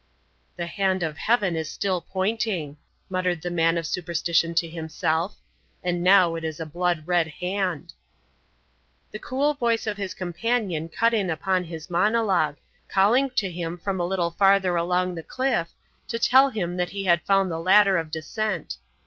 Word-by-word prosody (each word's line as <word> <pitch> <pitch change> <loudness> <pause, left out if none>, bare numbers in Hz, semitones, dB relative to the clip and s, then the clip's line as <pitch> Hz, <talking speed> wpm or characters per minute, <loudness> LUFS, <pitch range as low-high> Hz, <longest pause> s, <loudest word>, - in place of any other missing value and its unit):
"The 175 - -4
hand 190 +1 0
of 155 -2 -4
Heaven 205 -7 +1
is 160 -1 -3
still 185 -3 -1
pointing," 190 -5 -2 0.3
muttered 180 -3 -1
the 175 - -3
man 165 0 +2
of 165 - -2
superstition 170 0 0
to 165 0 +2
himself. 160 +2 -2 0.5
"And 175 -1 -1
now 185 -2 +5
it 165 0 -5
is 160 -1 -4
a 160 - -4
blood 175 +1 -1
red 175 -2 +2
hand." 180 0 -3 1.2
The 215 - -6
cool 280 +6 0
voice 235 -5 0
of 210 -2 -2
his 200 -2 -4
companion 180 -2 -2
cut 230 +8 +1
in 200 -5 +1
upon 180 +2 0
his 160 -2 -8
monologue, 190 -5 +2 0.3
calling 235 +8 +3
to 200 -8 0
him 170 0 -4
from 190 +2 -3
a 175 - 0
little 175 -2 -1
farther 195 0 +3
along 180 +2 0
the 165 - -6
cliff, 255 -4 -1 0.4
to 230 - -2
tell 260 +4 +5
him 180 -7 -3
that 180 0 -1
he 200 0 -5
had 170 -2 +4
found 195 -2 +2
the 165 - -3
ladder 195 +2 +5
of 165 -1 -5
descent. 185 +8 -3
180 Hz, 170 wpm, -25 LUFS, 165-200 Hz, 1.2 s, now